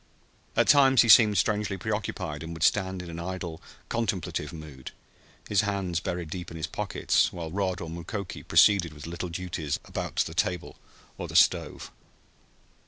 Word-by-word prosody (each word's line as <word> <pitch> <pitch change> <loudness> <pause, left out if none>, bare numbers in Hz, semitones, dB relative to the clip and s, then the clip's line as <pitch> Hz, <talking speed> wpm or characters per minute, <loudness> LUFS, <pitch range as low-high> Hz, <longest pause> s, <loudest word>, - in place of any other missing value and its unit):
At - - +3
times 135 -3 +6
he 115 - -1
seemed 105 -2 +7
strangely 105 0 0
preoccupied 95 -8 -3
and 80 +1 -6
would 80 - -4
stand 95 -2 +1
in 85 - -9
an 85 - -7
idle, 85 -2 -5 0.3
contemplative 115 -6 -2
mood, 75 -5 -9 0.6
his 105 -2 +3
hands 100 -4 -1
buried 85 -3 -4
deep 90 -1 -5
in 85 - -8
his 80 - -2
pockets, - - 0
while 85 -2 -6
Rod 95 -1 -1
or 85 - -5
Mukoki 85 +4 -6
proceeded 90 -6 +4
with 75 -1 -11
the 85 - -7
little 85 +1 -4
duties 85 -4 -3
about - - -5
the - - 0
table 90 -2 -2 0.4
or - - -4
the - - -9
stove. - - +2
90 Hz, 170 wpm, -27 LUFS, 85-100 Hz, 0.6 s, seemed